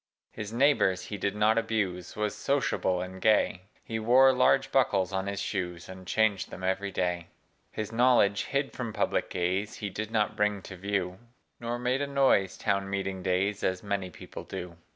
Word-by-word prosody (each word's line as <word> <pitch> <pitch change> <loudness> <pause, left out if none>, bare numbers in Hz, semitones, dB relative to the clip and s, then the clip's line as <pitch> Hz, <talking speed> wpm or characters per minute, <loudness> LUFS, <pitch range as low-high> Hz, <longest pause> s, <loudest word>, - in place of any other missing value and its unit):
His 105 -1 -6
neighbors 115 -8 +3
he 105 - -5
did 100 +1 -1
not 110 +2 +3
abuse 100 -6 -2
Was 105 -1 -1
sociable 105 -6 0
and 95 0 -9
gay: 105 -4 +3 0.2
He 110 -1 -4
wore 130 +4 +6
large 125 - +3
buckles 95 +1 +2
on 95 0 -1
his 100 -1 -3
shoes. 90 -4 -3
And 95 -1 -10
changed 110 -2 +1
them 95 - -9
every 95 +2 0
day. 90 -2 -2 0.4
His 110 -1 -4
knowledge, 115 -4 +3
hid 140 0 -1
from 120 -4 -4
public - - 0
gaze, 95 +4 -1
He 100 -2 -5
did 110 +2 -4
not 105 -2 0
bring 105 -2 0
to 95 - -9
view, 95 -1 -2 0.4
Nor 120 0 -3
made 125 +2 0
a 145 - -1
noise, 135 -9 +2
town 100 -2 0
meeting 95 -1 -3
days, 95 +2 0
As 95 +1 0
many 100 -2 -2
people - - -10
do. 90 -1 -7
100 Hz, 180 wpm, -29 LUFS, 95-110 Hz, 0.4 s, wore